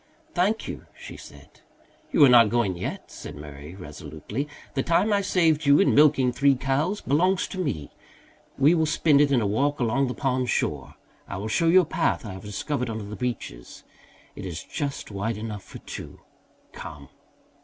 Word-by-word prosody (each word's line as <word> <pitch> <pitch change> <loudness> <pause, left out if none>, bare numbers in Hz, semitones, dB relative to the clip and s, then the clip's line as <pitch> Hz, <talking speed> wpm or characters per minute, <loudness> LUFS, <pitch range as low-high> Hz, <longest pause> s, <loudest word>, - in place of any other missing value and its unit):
"Thank 200 +5 +1
you," - - -7
she - - -9
said. - - -14 0.5
"You 145 - +7
are - - +6
not 120 -3 +7
going 115 -6 +1
yet," 85 - -6
said - - -9
Murray 75 +2 -10
resolutely. 100 - -6 0.3
"The 135 - 0
time 195 +8 +2
I 200 - +3
saved 165 -6 +2
you 140 0 +7
in 200 - +4
milking 140 -4 +5
three 140 +2 +3
cows 140 +10 -1
belongs 180 +6 +2
to 190 - -6
me. 80 - -3 0.7
We 140 +5 +5
will 160 -2 +2
spend 150 -2 +4
it 145 -1 +3
in 130 -3 +3
a - - 0
walk 140 +9 0
along 125 +3 +1
the 125 - -4
pond 130 -3 0
shore. - - -1 0.3
I 100 - -5
will 105 +3 -4
show 165 +9 +2
you 185 +3 +7
a - - -3
path 165 -5 0
I 105 - -6
have 95 - -9
discovered 125 +6 -3
under 110 -1 -4
the 105 +1 -7
beeches. 115 - -5 0.5
It - - -8
is 85 -2 -6
just 140 -6 -4
wide 105 +3 -2
enough 105 -2 -5
for - - -11
two. - - -9 0.5
Come." 70 -3 -10
130 Hz, 185 wpm, -25 LUFS, 105-155 Hz, 0.7 s, You